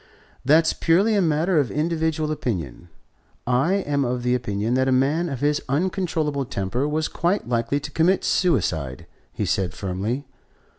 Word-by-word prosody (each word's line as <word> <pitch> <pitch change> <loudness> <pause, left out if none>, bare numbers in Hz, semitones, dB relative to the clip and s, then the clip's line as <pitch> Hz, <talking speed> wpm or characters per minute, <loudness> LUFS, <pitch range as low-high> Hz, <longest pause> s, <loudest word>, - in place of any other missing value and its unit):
"That's 160 +5 +4
purely 190 +7 +2
a 205 - +3
matter 165 +1 +2
of 140 - 0
individual 160 0 -1
opinion. 85 - -4 0.6
I 125 +9 +2
am 145 -8 0
of 125 -1 -2
the 125 0 +1
opinion 110 -2 -1
that 130 +1 +2
a - - +2
man 145 +7 +2
of 135 -4 -5
his 150 +1 +1
uncontrollable 155 -2 0
temper 120 +3 -2
was 155 +1 0
quite 175 0 -1
likely 120 +3 0
to 145 +1 -7
commit 170 +6 +2
suicide," 80 - 0 0.3
he - - -3
said 90 -4 -1
firmly. 105 +9 -3
145 Hz, 155 wpm, -23 LUFS, 120-160 Hz, 0.6 s, That's